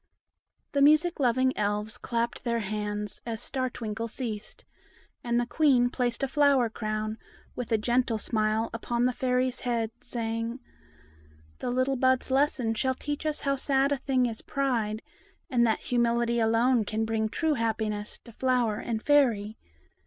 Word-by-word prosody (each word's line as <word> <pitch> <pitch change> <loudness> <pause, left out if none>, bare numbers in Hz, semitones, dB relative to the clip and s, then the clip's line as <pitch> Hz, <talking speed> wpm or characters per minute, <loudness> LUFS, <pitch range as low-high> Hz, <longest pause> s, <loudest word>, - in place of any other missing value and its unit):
The 280 - +1
music 310 +4 +4
loving 260 0 +2
Elves 210 +1 -2
clapped 235 0 -2
their 235 -2 0
hands, 210 0 -3
as 230 -2 -4
Star 255 +1 -1
Twinkle 225 -1 -4
ceased; 220 -3 -6 0.6
and 235 0 +1
the 240 - 0
Queen 250 -3 +3
placed 245 0 -1
a - - +2
flower 275 -4 +3
crown, 215 0 -3 0.4
with 245 -2 -5
a 225 - +4
gentle 240 +1 +1
smile, 215 +1 0
upon 235 +1 -1
the 250 - +2
Fairy's 255 0 0
head, 230 -3 -1
saying,— 230 0 -3 1.0
"The - - -3
little 255 +2 +1
bud's 260 +1 +2
lesson 265 -4 +2
shall 260 +4 0
teach 295 +3 -4
us 305 - -2
how 275 0 +1
sad 270 +1 +2
a 285 - +2
thing 260 -1 +1
is 225 -2 -3
pride, 230 -6 -1 0.5
and 240 -2 +4
that 220 - 0
humility 235 -1 +1
alone 230 +2 +3
can 220 +2 -2
bring 220 -1 0
true 315 +6 0
happiness 220 -3 -2
to 235 - -13
flower 245 -3 +1
and 225 -2 -3
Fairy. 235 -8 +3
235 Hz, 155 wpm, -28 LUFS, 220-260 Hz, 1.0 s, music